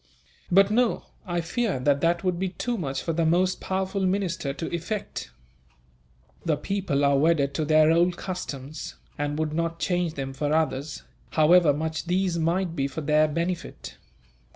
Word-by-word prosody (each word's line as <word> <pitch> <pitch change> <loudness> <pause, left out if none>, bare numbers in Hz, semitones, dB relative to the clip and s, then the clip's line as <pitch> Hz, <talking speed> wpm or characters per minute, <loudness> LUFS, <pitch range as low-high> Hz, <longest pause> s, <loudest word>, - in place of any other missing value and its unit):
"But 195 +3 +5
no; 240 +1 +2 0.2
I 175 -1 -1
fear 195 - -1
that 140 +2 +2
that 170 +1 +1
would 180 -2 0
be 190 0 0
too 240 +6 -3
much 140 -10 -3
for 165 - -1
the 165 +1 +1
most 180 +3 +2
powerful 190 +1 -2
minister 185 -6 0
to 160 +4 -4
effect. 195 +5 -4 1.1
The 155 -3 +1
people 150 -5 -1
are 140 -1 +4
wedded 145 -3 +2
to 155 - -1
their 155 +1 +5
old 175 +2 +3
customs, 155 -6 -6 0.2
and 145 0 -1
would 155 -1 -1
not 165 +1 -1
change 175 -2 -1
them 135 -1 -4
for 145 +2 -1
others, 150 -2 -1 0.3
however 160 0 +5
much 160 +3 -3
these 180 -1 0
might 170 +1 0
be 135 -3 0
for 140 +3 -6
their 155 +1 +3
benefit. 170 +3 -4
165 Hz, 165 wpm, -26 LUFS, 150-185 Hz, 1.1 s, But